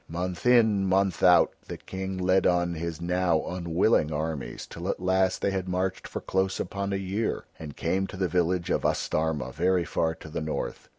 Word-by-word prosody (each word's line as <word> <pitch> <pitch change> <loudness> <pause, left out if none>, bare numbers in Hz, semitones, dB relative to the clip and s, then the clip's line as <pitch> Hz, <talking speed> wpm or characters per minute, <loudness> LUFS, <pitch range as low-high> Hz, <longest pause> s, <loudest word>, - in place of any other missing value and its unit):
Month 90 +4 -3
in, 110 -5 +4
month 95 -1 +1
out, 90 -1 +6 0.2
the - - -6
King 95 0 -5
led 95 +1 +3
on 85 -1 +2
his 85 -1 -4
now 90 -1 +1
unwilling 85 -1 +1
armies, 75 -1 -4
till 85 +3 -6
at - - -1
last 95 0 +1
they 100 - +2
had 95 -1 -3
marched 90 +1 -2
for - - -5
close 95 0 0
upon 100 +2 -3
a - - 0
year 95 +3 -2
and 75 -3 -8
came 95 +1 0
to - - -9
the 95 -1 +1
village 90 +1 0
of - - +1
Astarma 80 -3 0
very 90 0 +1
far 80 -1 0
to 80 - -12
the 80 - -4
north. 80 0 -4
90 Hz, 190 wpm, -27 LUFS, 85-95 Hz, 0.2 s, out